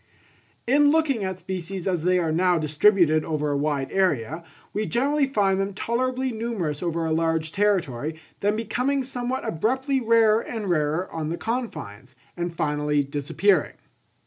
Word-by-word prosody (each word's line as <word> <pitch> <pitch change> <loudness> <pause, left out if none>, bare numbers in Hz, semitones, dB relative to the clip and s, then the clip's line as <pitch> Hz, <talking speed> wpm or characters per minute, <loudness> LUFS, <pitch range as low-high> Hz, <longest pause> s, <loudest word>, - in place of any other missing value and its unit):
In 285 +4 +4
looking 290 -8 +2
at 190 -1 -3
species 185 0 -5
as 180 -4 0
they 180 0 +4
are 165 -3 0
now 180 +2 +3
distributed 155 +1 +3
over 150 -2 -1
a - - 0
wide 140 -2 -1
area, 160 - 0 0.3
we 210 +1 -1
generally 280 +4 +1
find 195 -7 +1
them 195 0 -3
tolerably 255 +4 -1
numerous 220 -10 -3
over 170 -2 -1
a 160 - -1
large 160 -1 0
territory, 160 -8 0 0.2
then 205 +1 +1
becoming 255 +5 -1
somewhat 255 0 -3
abruptly 260 - 0
rarer 225 -1 +4
and 215 -6 -4
rarer 155 +2 0
on 155 -1 -3
the 170 - -3
confines, 220 - -5 0.2
and 175 -1 -4
finally 150 -1 0
disappearing. 145 +6 +1
185 Hz, 150 wpm, -24 LUFS, 155-230 Hz, 0.3 s, In